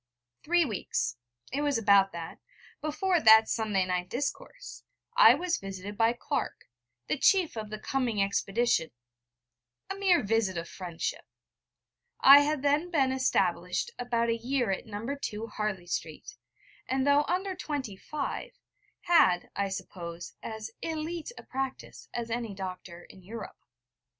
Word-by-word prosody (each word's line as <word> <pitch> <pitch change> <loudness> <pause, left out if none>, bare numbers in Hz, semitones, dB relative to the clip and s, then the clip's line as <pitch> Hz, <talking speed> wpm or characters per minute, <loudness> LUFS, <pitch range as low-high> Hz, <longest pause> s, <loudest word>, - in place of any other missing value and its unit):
Three 345 +1 +3
weeks 125 - -2 0.4
it 285 - 0
was 290 -3 +1
about 200 -3 +5
that 165 -1 -7 0.4
before 325 +4 +1
that 220 -4 +8
Sunday 210 -4 0
night 180 0 -2
discourse, 280 - -5 0.3
I - - +8
was 350 -1 -1
visited 195 +1 -7
by 225 +2 +3
Clark, 280 +4 -3 0.4
the 305 - -2
chief 370 -5 +4
of 215 -2 -5
the 215 - -5
coming 240 -1 -1
expedition 200 -2 +1 1.0
a - - -2
mere 375 -7 +3
visit 205 -3 +1
of 170 0 -4
friendship. 175 -3 -5 1.0
I 275 +1 +10
had 290 -1 0
then 295 +5 +2
been 275 -6 +2
established 265 - 0
about 235 -1 0
a 230 - +2
year 245 -1 -1
at 190 - -3
No. 210 +1 -6 0.3
II, 210 0 -6
Harley 210 -4 -2
Street, 160 -3 -5 0.5
and, 265 0 +1
though 285 +1 +5
under 375 +2 -1
twenty 285 - -4
five, 290 +9 -5 0.5
had, 185 - +4
I 200 0 0
suppose, 170 -2 -7
as 220 0 -6
élite 325 +4 -4
a - - -9
practice 265 0 -5
as 235 -1 -4
any 230 -3 -3
doctor 185 -2 -7
in 190 - -15
Europe. 215 +4 -9
230 Hz, 140 wpm, -29 LUFS, 195-290 Hz, 1.0 s, I